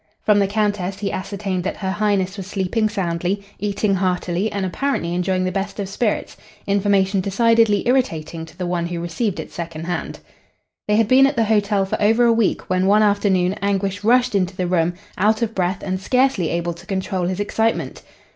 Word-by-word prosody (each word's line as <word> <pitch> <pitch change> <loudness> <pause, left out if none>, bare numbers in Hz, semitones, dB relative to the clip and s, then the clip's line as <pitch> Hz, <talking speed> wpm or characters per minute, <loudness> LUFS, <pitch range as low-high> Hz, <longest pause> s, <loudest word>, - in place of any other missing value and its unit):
From 210 -1 +4
the 200 - +2
Countess 205 -2 -1
he 200 -1 -3
ascertained 195 -1 -3
that 190 - -3
Her 190 -2 -2
Highness 200 -2 0
was 195 -3 -7
sleeping 205 +3 0
soundly, 185 0 -2 0.2
eating 205 0 0
heartily 185 +1 0
and 200 -1 -2
apparently 185 -4 -1
enjoying 185 +1 0
the 185 - -1
best 195 +3 -4
of 200 - -2
spirits 210 +2 -2 0.3
information 200 -1 +2
decidedly 225 +1 +3
irritating 165 -11 0
to - - -17
the 185 - -3
one 175 -1 -1
who 170 -1 -4
received 175 +5 -2
it - - -7
second 165 -2 -6
hand. 175 +1 -4 0.7
They 210 - +2
had 220 0 +3
been 265 +3 +6
at 275 - -2
the 230 - +2
hotel 205 -2 +2
for 190 - -3
over 225 +3 +4
a 235 - +5
week 225 -3 0
when 185 +1 +1
one 210 +2 +5
afternoon 195 -3 +2
Anguish 200 0 -1
rushed 245 +2 +3
into 185 -2 0
the 185 - -1
room, 175 -1 +1 0.2
out 215 +4 +2
of 225 -1 -2
breath 185 0 -1
and 185 -1 -3
scarcely 250 -6 +2
able 170 0 -1
to 170 +3 -15
control 190 -2 -2
his 185 +1 -3
excitement. 220 +2 -1
195 Hz, 195 wpm, -21 LUFS, 185-210 Hz, 0.7 s, been